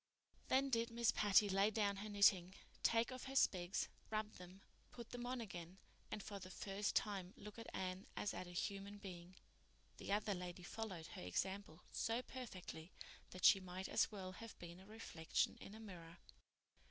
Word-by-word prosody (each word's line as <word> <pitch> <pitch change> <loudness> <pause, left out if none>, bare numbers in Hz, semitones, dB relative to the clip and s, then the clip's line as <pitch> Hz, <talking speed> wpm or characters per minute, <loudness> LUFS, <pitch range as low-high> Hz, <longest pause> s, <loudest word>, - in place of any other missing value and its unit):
Then 270 +1 +4
did 230 -1 +3
Miss 235 0 +3
Patty 205 0 +6
lay 195 +1 +4
down 205 -2 +2
her 210 +2 -4
knitting, 195 -3 +5 0.3
take 230 +2 +4
off 255 0 -5
her 270 0 -5
specs, 185 -7 +3 0.2
rub 215 0 0
them, 180 +2 -11 0.3
put 235 -2 -8
them 245 0 -3
on 255 0 -1
again, 180 -5 -6 0.3
and 210 - -3
for 200 -2 -5
the 185 -1 -8
first 200 +2 -1
time 195 -3 0
look 210 +2 -8
at 230 - -7
Anne 185 +1 -3
as 205 - 0
at 185 - -4
a - - -8
human 200 +3 -2
being. 185 -3 -8 0.6
The - - -4
other 205 0 +2
lady 180 -1 -5
followed 190 -4 -4
her - - -7
example 180 - -2
so 230 +2 +1
perfectly 185 -10 -7 0.4
that 185 - -1
she 195 - +10
might 185 0 -4
as - - +3
well 190 -3 -4
have 225 +4 -9
been 175 0 -8
a 190 - -13
reflection 210 -7 0
in 205 - -9
a - - -9
mirror. 175 -6 -9
200 Hz, 180 wpm, -42 LUFS, 180-220 Hz, 0.6 s, she